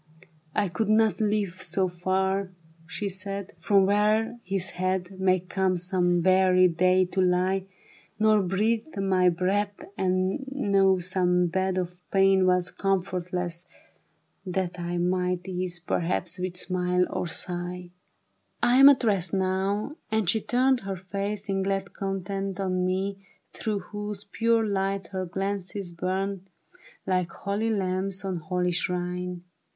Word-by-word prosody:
*' 155 -1 -34
I 205 - +2
could 200 +4 -2
not 220 -1 +3
live 205 -4 0
so 185 +2 +1
far," 190 +2 -1 0.4
she 200 +4 -4
said, 195 0 -5
" - - -32
From 195 +3 +4
where 215 +4 +2
his 190 0 -2
head 185 +1 -2
May 185 -1 +3
come 185 0 0
some 175 -1 +1
weary 185 0 +5
day 185 +2 +3
to 190 +1 -1
lie; 185 +1 +1 0.5
Nor 215 -1 +4
breathe 215 - 0
my 190 -2 +3
breath 195 +4 0 0.2
and 185 +6 0
know 195 -8 +3
some 180 0 +2
bed 185 +2 0
Of 180 -1 -3
pain 195 -1 +4
was 180 0 +2
comfortless, 180 -2 -2 0.8
that 180 -1 -3
I 175 0 -3
Might 180 0 0
ease 180 -1 -3
perhaps 175 +1 -1
with 180 0 -3
smile 180 0 +1
or - - -3
sigh. 175 +1 -3 0.7
*'I 245 - +4
am 275 +1 +10
at 280 -2 +4
rest 195 -4 +2
now," 195 - -1
and 220 -3 0
she 220 +5 +2
turned 255 +3 +2
Her 195 -3 -5
face 200 +2 -4
in 195 -1 0
glad 195 0 -2
content 195 0 -3
on 185 -1 0
mine. 190 +2 -1 0.4
Through 215 -2 -2
whose 205 -1 -5
pure 230 +2 +1
light 195 -2 -1
her 185 -2 -3
glances 195 0 -4
burned 190 +2 -3 0.6
Like 185 -2 0
holy 205 +5 -2
lamps 190 -1 -1
on 190 -2 -2
holy 180 +2 -1
shrine. 180 0 -3
190 Hz, 140 wpm, -26 LUFS, 180-200 Hz, 0.8 s, am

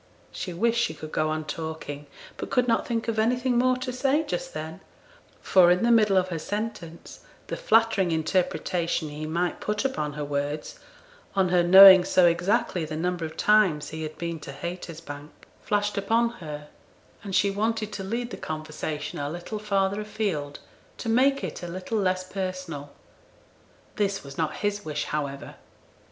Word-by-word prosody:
She 185 - -5
wished 230 +7 +1
she 160 - -2
could 155 0 -9
go 155 0 0
on 155 0 -2
talking, 155 -3 -6 0.3
but - - -5
could 250 -1 +2
not 230 -1 +1
think 230 -1 -2
of 225 -1 0
anything 245 +2 +2
more 255 0 +3
to 255 0 -4
say 275 +4 +1
just - - -4
then; - - -6 0.6
for, 180 -2 +6
in 180 +3 +3
the 235 - +4
middle 210 -4 +5
of 185 0 +2
her 165 -2 -3
sentence, 205 -4 -6 0.3
the - - -4
flattering 220 -5 +3
interpretation 165 0 0
he 150 +1 -6
might 170 +2 -1
put 210 +4 -2
upon 150 - -1
her 150 0 -4
words, 145 +1 -3 0.6
on 190 -2 +3
her 180 0 +4
knowing 190 +1 +10
so 180 0 +4
exactly 180 +2 +1
the 155 0 -5
number 175 0 -1
of 160 0 -8
times 205 -8 +3
he 160 +1 -6
had 155 0 -6
been 170 -1 -4
to 145 - -8
Haytersbank, 155 -1 -7 0.3
flashed 205 -1 0
upon 230 +4 +2
her, 150 -2 -7 0.5
and 195 -3 -4
she 200 - +3
wanted 215 +1 -1
to 195 - -5
lead 235 +5 -3
the - - -6
conversation 155 -1 -5
a 145 0 -2
little 175 +6 -5
farther 200 -1 0
afield 185 -10 -3 0.4
to 230 - -4
make 270 +4 +3
it - - -5
a 175 - -5
little 185 +5 -3
less 185 -1 +1
personal. 185 -6 -5 1.1
This 200 -2 0
was 140 -1 -10
not 155 0 -1
his 205 0 -1
wish, 155 -4 -3
however. 140 -2 -4
185 Hz, 170 wpm, -26 LUFS, 155-215 Hz, 1.1 s, knowing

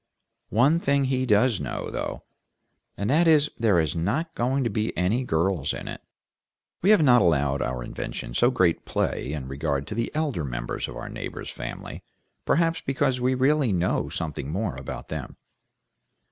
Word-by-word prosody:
One 135 +10 +4
thing 140 -3 +2
he 130 -1 0
does 110 0 +3
know, 65 -4 -4
though, - - -4 0.7
and 100 - -2
that 165 +4 +4
is 150 -2 +5
there 110 -5 +3
are 80 - +3
not 115 - -1
going 130 +3 0
to 120 - 0
be 110 +2 -2
any 100 +9 +1
girls 85 - 0
in - - -7
it. - - -6 0.8
We 190 - +3
have 210 -7 +6
not 125 -4 +6
allowed 70 -5 +2
our 65 -1 -2
invention - - -6
so 120 - +4
great 95 -10 +2
play 65 - -1
in 75 -4 -4
regard 70 0 -2
to - - -6
the 115 +2 -1
elder 150 - -1
members - - -3
of - - -8
our - - -6
neighbor's - - -6
family - - -7 0.4
perhaps 165 +1 +2
because 135 -2 0
we 130 +1 +2
really 135 -1 +3
know 90 -5 0
something 80 -5 -4
more 95 -3 -2
about 65 0 -7
them. - - -6
110 Hz, 175 wpm, -25 LUFS, -, 0.8 s, have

